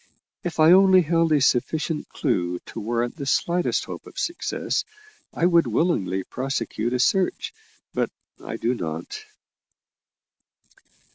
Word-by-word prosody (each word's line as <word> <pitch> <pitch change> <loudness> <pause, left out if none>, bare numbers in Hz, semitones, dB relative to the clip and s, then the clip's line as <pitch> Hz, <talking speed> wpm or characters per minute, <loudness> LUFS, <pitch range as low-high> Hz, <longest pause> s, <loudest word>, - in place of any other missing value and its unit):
If 175 -2 -4
I 155 +1 +7
only 190 0 +7
held 165 0 +1
a 150 - +4
sufficient 150 +4 0
clue 90 -10 -1
to - - -8
warrant 120 +5 -2
the 140 -3 -5
slightest 175 +6 +1
hope - - -8
of - - -14
success, 340 - -2 0.5
I 170 - 0
would 170 -2 +4
willingly 95 - 0
prosecute 120 -2 -3
a 125 - 0
search, 185 +8 +1 0.4
but - - 0 0.3
I - - -5
do 120 +2 0
not." 80 -7 -5
140 Hz, 130 wpm, -24 LUFS, 115-170 Hz, 0.5 s, I